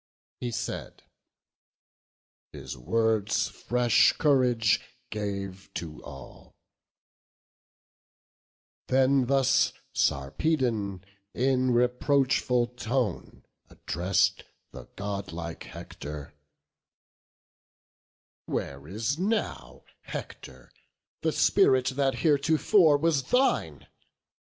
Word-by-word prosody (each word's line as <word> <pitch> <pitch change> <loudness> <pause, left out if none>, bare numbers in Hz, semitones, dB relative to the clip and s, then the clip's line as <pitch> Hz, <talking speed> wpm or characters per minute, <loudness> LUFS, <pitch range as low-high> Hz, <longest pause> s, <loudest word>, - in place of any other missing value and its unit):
He 125 - -3
said; 115 - -5 1.5
his - - -8
words 110 - +1
fresh 120 -2 +3
courage 125 -7 +3 0.3
gave 100 -2 -5
to 80 -3 -6
all: - - -12 2.3
Then 130 0 +3
thus 135 -1 +3 0.2
Sarpedon, 100 - 0 0.3
in 130 0 +2
reproachful 125 0 +2
tone, 125 -1 -2 0.2
Address'd 95 +2 0 0.3
the - - -10
godlike 100 -5 -5
Hector; 75 0 -9 2.1
"Where 70 +1 -4
is 115 - -2
now, 215 +3 -2 0.2
Hector, 65 -2 -9 0.5
the - - +1
spirit 130 -1 +3
that 135 0 0
heretofore 155 +2 +4
was 145 -3 +1
thine? 255 - +1
120 Hz, 70 wpm, -27 LUFS, 100-135 Hz, 2.3 s, heretofore